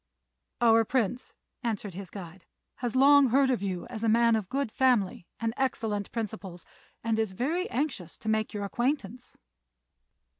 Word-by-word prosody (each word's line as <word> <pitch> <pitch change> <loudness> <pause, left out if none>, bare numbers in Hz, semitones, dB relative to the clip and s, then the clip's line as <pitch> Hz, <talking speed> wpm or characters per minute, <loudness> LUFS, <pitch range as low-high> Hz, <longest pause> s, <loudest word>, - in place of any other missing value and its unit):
"Our 225 -1 +6
Prince," 245 +1 -1 0.3
answered 215 -5 -3
his 190 0 -7
guide, 185 -2 -10 0.3
"has 245 -1 -3
long 280 +1 +7
heard 265 +2 +3
of 245 - 0
you 185 -3 -3
as 230 -2 -7
a 225 - +3
man 230 +1 +4
of 210 -4 -3
good 275 -4 -1
family 230 -10 +1
and 225 0 -1
excellent 220 -6 -1
principles, 205 -6 -5 0.4
and 225 -1 0
is 220 -4 -1
very 315 - -1
anxious 240 - -3
to - - -11
make 220 0 +1
your 205 -1 -4
acquaintance." 240 +1 -2
225 Hz, 155 wpm, -28 LUFS, 200-255 Hz, 0.4 s, long